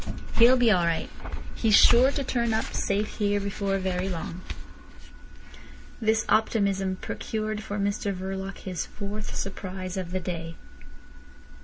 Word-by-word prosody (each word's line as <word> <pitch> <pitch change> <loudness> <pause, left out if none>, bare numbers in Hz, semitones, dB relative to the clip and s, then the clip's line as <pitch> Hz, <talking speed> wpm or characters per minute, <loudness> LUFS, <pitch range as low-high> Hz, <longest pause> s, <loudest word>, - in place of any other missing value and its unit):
He'll 240 +3 +7
be 240 -3 +5
all 180 -4 +3
right. 165 -1 -1 0.4
He's 220 -3 +3
sure 245 +3 +7
to 280 - -1
turn 235 -3 0
up 220 - 0
safe 205 +2 -1
here 205 -1 +1
before 200 0 -1
very 185 0 -1
long." 170 0 -5 1.6
This 220 0 +2
optimism 200 -4 +2
procured 215 +2 -4
for 205 -1 -5
Mr 200 0 0
Verloc 190 +1 -5
his 185 -3 -4
fourth 210 +1 -6
surprise 185 -1 -4
of 185 -2 -3
the 185 +1 -1
day. 165 -2 -5
200 Hz, 135 wpm, -27 LUFS, 185-215 Hz, 1.6 s, He'll